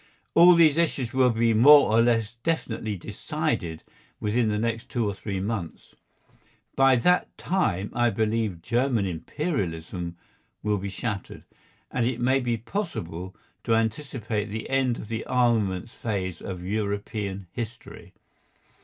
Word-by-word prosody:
All 175 Hz, +1 st, +8 dB
these 160 Hz, -3 st, +5 dB
issues 140 Hz, -7 st, 0 dB
will 130 Hz, -1 st, +4 dB
be 115 Hz, 0 st, +2 dB
more 140 Hz, +4 st, +7 dB
or 115 Hz, -, +6 dB
less 115 Hz, -1 st, +2 dB
definitely 115 Hz, -9 st, -2 dB
decided 85 Hz, -1 st, -3 dB, 0.4 s
within 110 Hz, +2 st, +1 dB
the 105 Hz, -1 st, 0 dB
next 115 Hz, +1 st, -2 dB
two 120 Hz, -3 st, -1 dB
or 100 Hz, -, -1 dB
three 100 Hz, 0 st, -4 dB
months. 100 Hz, -4 st, -5 dB, 0.8 s
By 135 Hz, -1 st, +5 dB
that 180 Hz, +9 st, +2 dB
time 105 Hz, -, 0 dB
I 120 Hz, 0 st, +3 dB
believe 110 Hz, -4 st, -1 dB
German 120 Hz, -3 st, +1 dB
Imperialism 90 Hz, -, -3 dB, 0.5 s
will 105 Hz, -1 st, +1 dB
be 100 Hz, +1 st, -4 dB
shattered, 100 Hz, 0 st, -5 dB, 0.5 s
and 120 Hz, -2 st, +1 dB
it 125 Hz, -1 st, -2 dB
may 130 Hz, +2 st, +3 dB
be 120 Hz, -2 st, -1 dB
possible 95 Hz, -, -5 dB, 0.3 s
to 115 Hz, -, +2 dB
anticipate 115 Hz, -2 st, -1 dB
the 110 Hz, +3 st, -6 dB
end 130 Hz, -3 st, +2 dB
of -, -, -8 dB
the 115 Hz, 0 st, -3 dB
armaments 115 Hz, -5 st, +1 dB
phase 95 Hz, -6 st, -3 dB
of 90 Hz, -2 st, -6 dB
European 100 Hz, -1 st, -3 dB
history. 115 Hz, 0 st, -8 dB
115 Hz, 135 wpm, -26 LUFS, 100-125 Hz, 0.8 s, All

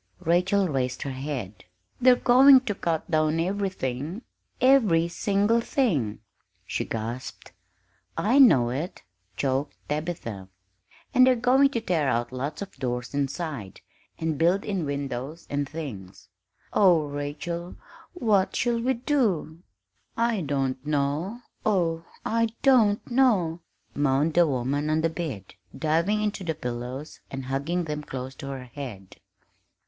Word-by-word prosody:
Rachel 185 Hz, +4 st, +2 dB
raised 130 Hz, -4 st, -2 dB
her 140 Hz, -, -4 dB
head. 130 Hz, -8 st, -5 dB, 0.4 s
"They're 250 Hz, 0 st, +7 dB
going 260 Hz, +2 st, +7 dB
to 240 Hz, -5 st, -2 dB
cut 170 Hz, -3 st, -2 dB
down 155 Hz, 0 st, +2 dB
everything 180 Hz, -, -2 dB, 0.4 s
every 225 Hz, -11 st, +4 dB
single 205 Hz, +6 st, +1 dB
thing!" 150 Hz, -, 0 dB, 0.4 s
she -, -, -2 dB
gasped. 115 Hz, +3 st, -6 dB, 0.7 s
"I 245 Hz, +7 st, +3 dB
know 130 Hz, -, +6 dB
it," 150 Hz, +8 st, -4 dB, 0.3 s
choked 135 Hz, +1 st, -1 dB
Tabitha, 150 Hz, -, -4 dB, 0.7 s
"and 255 Hz, 0 st, +6 dB
they're 255 Hz, -, +5 dB
going 255 Hz, +4 st, +4 dB
to 235 Hz, -4 st, -2 dB
tear 165 Hz, -9 st, +1 dB
out 120 Hz, +1 st, -1 dB
lots 140 Hz, +7 st, -4 dB
of 195 Hz, -, -12 dB
doors 125 Hz, -2 st, -3 dB
inside, 140 Hz, -, -3 dB, 0.4 s
and 160 Hz, -3 st, -2 dB
build 175 Hz, +4 st, +2 dB
in 195 Hz, -6 st, -2 dB
windows 140 Hz, +2 st, -4 dB
and 145 Hz, -1 st, -1 dB
things. 100 Hz, -, -8 dB, 0.4 s
Oh, 175 Hz, -6 st, +5 dB
Rachel, 150 Hz, +5 st, -5 dB, 0.4 s
what 210 Hz, -, +1 dB
shall 235 Hz, -1 st, +1 dB
we 260 Hz, +2 st, +1 dB
do?" 225 Hz, -, 0 dB, 0.6 s
"I 230 Hz, -3 st, +1 dB
don't 135 Hz, -3 st, -1 dB
know, 150 Hz, -, -1 dB, 0.2 s
oh, 165 Hz, -5 st, +1 dB, 0.2 s
I 230 Hz, +1 st, +2 dB, 0.2 s
don't 225 Hz, -7 st, +4 dB
know!" 210 Hz, -11 st, +3 dB, 0.3 s
moaned 145 Hz, +2 st, +1 dB
the 175 Hz, 0 st, +5 dB
woman 140 Hz, +2 st, -1 dB
on 155 Hz, +1 st, +2 dB
the 165 Hz, 0 st, +1 dB
bed, 145 Hz, -, -5 dB, 0.2 s
diving 170 Hz, +7 st, +1 dB
into 210 Hz, -2 st, -2 dB
the 165 Hz, -3 st, -2 dB
pillows 125 Hz, +4 st, -6 dB
and 135 Hz, -1 st, -6 dB
hugging 140 Hz, +7 st, -1 dB
them 150 Hz, -2 st, -4 dB
close 130 Hz, -2 st, -6 dB
to 135 Hz, -, -7 dB
her 135 Hz, -2 st, -6 dB
head. 120 Hz, -7 st, -9 dB
160 Hz, 135 wpm, -26 LUFS, 135-200 Hz, 0.7 s, They're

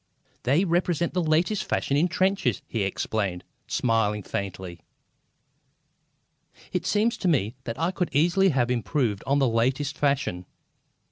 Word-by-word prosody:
"They 145 Hz, +10 st, +2 dB
represent 170 Hz, -1 st, 0 dB
the 180 Hz, -, +1 dB
latest 170 Hz, +6 st, +1 dB
fashion 140 Hz, -, -1 dB
in 155 Hz, +5 st, +3 dB
trenches!" 185 Hz, -, 0 dB
he 115 Hz, -, -2 dB
explained, 95 Hz, -1 st, -2 dB, 0.2 s
smiling 110 Hz, -3 st, +1 dB
faintly. 95 Hz, -3 st, -5 dB, 1.9 s
It -, -, -1 dB
seemed 215 Hz, +3 st, +2 dB
to 190 Hz, -, -1 dB
me 120 Hz, -, +2 dB
that 115 Hz, -1 st, -4 dB
I 165 Hz, +3 st, 0 dB
could 180 Hz, -1 st, -2 dB
easily 175 Hz, +6 st, +3 dB
have 125 Hz, -5 st, +1 dB
improved 120 Hz, -3 st, -1 dB
on 140 Hz, +1 st, +3 dB
that 140 Hz, -, +3 dB
latest 130 Hz, +5 st, 0 dB
fashion. 140 Hz, -12 st, -1 dB
140 Hz, 135 wpm, -26 LUFS, 110-175 Hz, 1.9 s, in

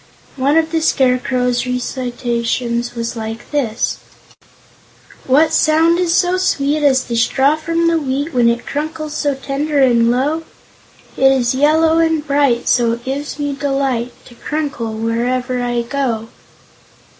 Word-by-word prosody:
One 280 Hz, +3 st, +2 dB
of 320 Hz, 0 st, +1 dB
the 325 Hz, -1 st, 0 dB
Scarecrow's 250 Hz, -3 st, +1 dB
recitations 240 Hz, -1 st, -2 dB
was 235 Hz, +1 st, -4 dB
like 225 Hz, 0 st, -7 dB
this: 245 Hz, -6 st, -1 dB, 1.3 s
"What 305 Hz, +4 st, +3 dB
sound 320 Hz, +2 st, +3 dB
is 355 Hz, -2 st, +1 dB
so 360 Hz, +1 st, +2 dB
sweet 295 Hz, -4 st, 0 dB
As 265 Hz, -3 st, +3 dB
the 235 Hz, -, -4 dB
straw 265 Hz, +5 st, +2 dB
from 330 Hz, +2 st, -1 dB
the 335 Hz, -1 st, +2 dB
wheat 285 Hz, +2 st, -3 dB
When 240 Hz, -2 st, +4 dB
it 235 Hz, +1 st, -2 dB
crunkles 310 Hz, +1 st, -4 dB
so 290 Hz, -2 st, -1 dB
tender 285 Hz, +3 st, -3 dB
and 235 Hz, -3 st, +4 dB
low? 280 Hz, +7 st, 0 dB, 0.8 s
It 270 Hz, 0 st, +5 dB
is 255 Hz, -2 st, +1 dB
yellow 315 Hz, +4 st, +3 dB
and 320 Hz, -2 st, +1 dB
bright, 280 Hz, -5 st, +1 dB
So 235 Hz, -2 st, +3 dB
it 235 Hz, +1 st, -7 dB
gives 280 Hz, +4 st, -4 dB
me 290 Hz, -1 st, -2 dB
delight 270 Hz, -4 st, -1 dB
To 245 Hz, -, -15 dB
crunkle 275 Hz, -4 st, -4 dB
wherever 245 Hz, +3 st, -1 dB
I 240 Hz, -1 st, -1 dB
go. 235 Hz, -3 st, -2 dB
270 Hz, 145 wpm, -17 LUFS, 240-300 Hz, 1.3 s, It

